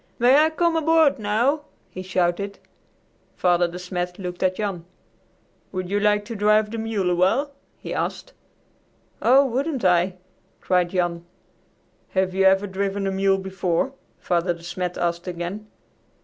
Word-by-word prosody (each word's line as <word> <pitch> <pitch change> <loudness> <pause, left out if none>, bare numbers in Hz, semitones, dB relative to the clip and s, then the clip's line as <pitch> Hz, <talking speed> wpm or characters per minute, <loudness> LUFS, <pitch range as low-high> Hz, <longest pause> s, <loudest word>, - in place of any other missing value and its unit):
"May 245 +3 +5
I 310 +1 +5
come 335 +1 +1
aboard 320 -3 +3
now?" 230 +8 +1 0.3
he 185 - -7
shouted. 185 +2 -1 0.8
Father 175 -1 +2
De 175 +1 -8
Smet 180 0 -4
looked 180 -2 -6
at 185 0 +2
Jan. 195 -5 -3 0.9
"Would 185 -1 -4
you 205 - +2
like 210 0 +2
to 230 +1 -6
drive 210 +1 +3
the 230 - -4
mule 215 -5 -1
awhile?" 190 +12 +2 0.3
he - - -6
asked. - - -4 0.9
"Oh, 270 +3 +5
wouldn't 265 -1 -2
I!" 180 +1 +3 0.4
cried 180 -1 +1
Jan. 175 -2 -1 0.9
"Have 190 -1 +1
you 190 0 +2
ever 190 +1 +4
driven 195 0 -2
a 195 - 0
mule 195 0 +2
before?" 190 +5 -1 0.2
Father 175 0 0
De 170 - -15
Smet 180 +1 -4
asked 170 +1 -2
again. 180 +4 -5
190 Hz, 150 wpm, -23 LUFS, 180-220 Hz, 0.9 s, May